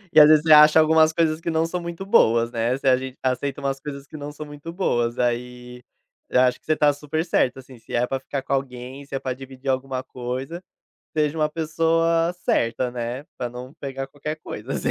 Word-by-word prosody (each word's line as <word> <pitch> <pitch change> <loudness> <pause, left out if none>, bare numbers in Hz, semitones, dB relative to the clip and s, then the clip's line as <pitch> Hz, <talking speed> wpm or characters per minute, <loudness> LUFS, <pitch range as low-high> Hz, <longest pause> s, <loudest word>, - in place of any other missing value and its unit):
E - - +10
às 150 - +10
vezes 155 -1 +6
você 160 -1 +6
acha 150 +1 +8
algumas 160 0 +5
coisas 160 -1 0
que 170 - -3
não 160 0 +1
são 175 +1 -3
muito 170 +2 -6
boas, 115 - +4
né, 120 +3 0
se 135 - -4
a 130 - +6
gente 130 0 -6
aceita 130 +2 -1
umas 135 -1 -2
coisas 140 -1 -7
que 155 - -13
não 145 -1 -6
são 150 +1 -8
muito 145 +3 -9
boas 120 -10 0
aí, 125 0 -3 0.5
eu 125 - +4
acho 125 -1 +2
que - - -37
você 155 - +3
tá 150 -1 +3
super 150 +3 -3
certa, 130 -6 +1
assim, 130 -2 -14
se - - -7
é 120 - +2
para 135 +1 -3
ficar 135 +1 -5
com - - -3
alguém, 130 0 -4
se 140 - -7
é - - -1
para 130 -1 -3
dividir 135 0 -11
alguma 130 0 -1
coisa, 130 +7 -5 0.6
seja 150 +1 +1
uma 150 - +2
pessoa 165 +1 +1
certa, 125 -8 0
né, 120 +2 -4 0.2
para 125 - -2
não 125 +2 -9
pegar 135 -1 -5
qualquer 145 +2 -5
coisa 120 -2 -7
assim. - - -1
135 Hz, 225 wpm, -23 LUFS, 125-155 Hz, 0.6 s, E